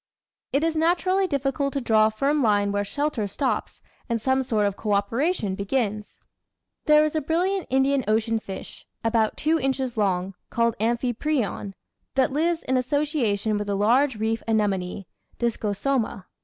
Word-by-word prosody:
It 280 +3 +1
is 325 -1 +1
naturally 365 +4 +2
difficult 280 -1 -1
to 280 - 0
draw 220 -3 +4
a - - +1
firm 280 +7 0
line 205 -3 +2
where 205 0 0
shelter 285 -1 -2
stops 255 +6 -2 0.3
and 230 -1 0
some 260 +3 +1
sort 220 -5 0
of 200 -1 0
co 210 0 -2
operation 220 - 0
begins. 210 +1 -2 0.7
There 300 0 +6
is 310 - -2
a 310 - +1
brilliant 360 +6 0
Indian 270 +1 +2
Ocean 225 +1 +1
fish, 195 -3 -9 0.2
about 225 -1 +1
two 320 +2 +1
inches 265 -3 -1
long, 190 -2 0 0.2
called 230 -1 +1
Amphiprion, 235 -2 -1 0.4
that 265 0 +2
lives 330 +3 0
in 260 - +1
association 250 -7 0
with 205 0 -4
a 200 - 0
large 245 +6 +3
reef 220 +1 -1
anemone 200 -4 0 0.3
(Discosoma). 225 -1 -1
235 Hz, 155 wpm, -25 LUFS, 210-285 Hz, 0.7 s, There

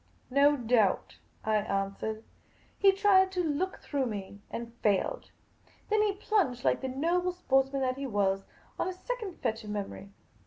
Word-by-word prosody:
" - - -34
No 285 +2 +5
doubt," 230 -5 +1 0.3
I 215 0 +3
answered. 200 +2 -2 0.6
He 395 - +7
tried 385 -1 +4
to 360 -1 0
look 335 +5 -1
through 275 -3 -1
me, 200 -2 -6
and 230 0 -6
failed. 210 - +1 0.6
Then 430 0 +4
he 420 -1 +2
plunged, 390 - 0
like - - +2
the 265 - -2
noble 345 +7 0
sportsman 270 -5 +1
that 255 0 0
he 275 - -3
was, 195 -3 +1 0.4
on - - 0
a 370 - -2
second 425 -2 -5
fetch 225 +1 -1
of 210 - -8
memory. 200 -1 -5
270 Hz, 165 wpm, -30 LUFS, 215-365 Hz, 0.6 s, He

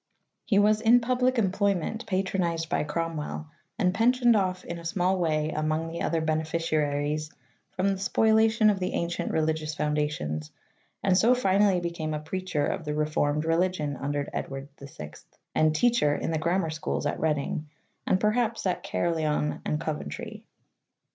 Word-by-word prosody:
He 205 - +2
was 210 +1 +4
in 235 +2 +6
public 255 +1 +1
employment, 200 +1 0
patronized 180 -4 -1
by - - +1
Cromwell, 155 0 -3 0.3
and 185 -5 +2
pensioned 240 +2 +4
off 185 -2 0
in 170 0 -5
a - - -11
small 185 +2 0
way' 155 -2 0
among 155 +1 -1
the 170 +1 -5
other 165 -1 0
bene 155 0 +1
ficiaries 150 -2 -1 0.4
from 190 +2 +1
the 195 -1 -1
spoliation 220 +2 +4
of 195 - -2
the 185 - -2
ancient 170 0 -2
religious 155 -1 -1
foundations, 150 - -2 0.5
and 190 -2 +3
so 230 +7 +5
finally 195 -4 +3
became 170 -3 -3
a - - -2
preacher 160 -1 -2
of 190 +2 -2
the 150 -1 -3
reformed 150 0 0
religion 165 -3 0
under 140 +1 -2
Edward 135 +1 -5
VI 105 - -9 0.4
and 155 0 +3
teacher 230 -5 +3
in - - -2
the 160 - 0
grammar 170 0 0
schools 155 -1 -3
at 145 - -1
Reading, 150 0 -1 0.4
and 185 - +3
perhaps 225 +1 0
at 185 - 0
Caerleon 155 -3 -1
and 150 - -1
Coventry. 215 +8 -5
165 Hz, 155 wpm, -27 LUFS, 155-200 Hz, 0.5 s, in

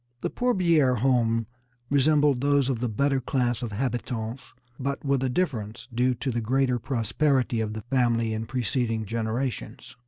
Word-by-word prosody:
The - - -2
Pourbiere 170 - +3
home 115 -2 +2 0.5
resembled 145 -1 +3
those 140 -1 +2
of 125 -4 -1
the 125 0 -1
better 135 +5 +1
class 125 -2 0
of 120 -3 -4
habitants, 120 +1 -3 0.4
but 140 +2 -3
with 140 -1 +2
a 130 - 0
difference 120 - -2
due 125 +2 +2
to 130 +3 -2
the 120 0 -1
greater 125 +2 +1
prosperity 125 +1 0
of 110 -1 -2
the 110 - -5
family 120 -3 +1
in 110 0 -4
preceding 115 -2 -1
generations. 115 +3 -3
125 Hz, 155 wpm, -26 LUFS, 115-135 Hz, 0.5 s, Pourbiere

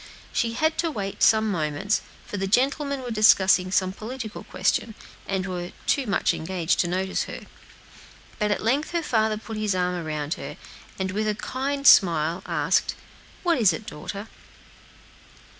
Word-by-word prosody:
She 230 -1 0
had 315 +5 0
to 335 -1 +1
wait 200 -9 -5
some 220 -1 +4
moments, 155 +4 0 0.2
for 205 - -5
the 195 0 -1
gentlemen 275 +5 +1
were 245 - -5
discussing 190 -4 +5
some 185 -1 +2
political 220 +1 -7
question, 225 - -1 0.3
and 190 -1 -1
were 180 -1 -5
too 275 -4 +1
much 200 - +2
engaged 170 0 -1
to 175 - +2
notice 190 +2 -1
her. - - -7 1.0
But 210 - +1
at 205 - -1
length 275 +9 0
her 340 -1 0
father 220 -5 +1
put 220 0 -7
his 210 -3 0
arm 180 0 0
around 155 -3 -3
her, - - -7 0.4
and 190 -1 -2
with 215 +3 -1
a 210 - 0
kind 275 +5 -3
smile 170 - +5
asked, 165 0 +1 0.5
"What 340 -6 +2
is 200 -7 +5
it, 210 - -6
daughter?" 200 +4 -7
205 Hz, 160 wpm, -25 LUFS, 185-235 Hz, 1.0 s, discussing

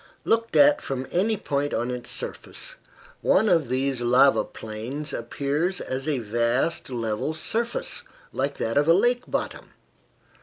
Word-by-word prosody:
Looked 230 0 +1
at 290 0 +6
from 130 -1 -3
any 210 +5 +1
point 145 -6 -1
on 120 +2 -1
its 125 -1 -5
surface, - - -4 0.5
one 220 - +4
of 165 -7 +3
these 130 0 0
lava 125 +3 +5
plains 125 +7 -6
appears 145 +9 -1
as 135 +3 -3
a 145 - +1
vast 120 +8 0
level 115 +4 -2
surface, 230 +8 -2 0.3
like 140 +1 -1
that 115 +4 -1
of 145 - +1
a 165 - +7
lake 240 +5 +3
bottom. - - -4
140 Hz, 145 wpm, -25 LUFS, 125-175 Hz, 0.5 s, a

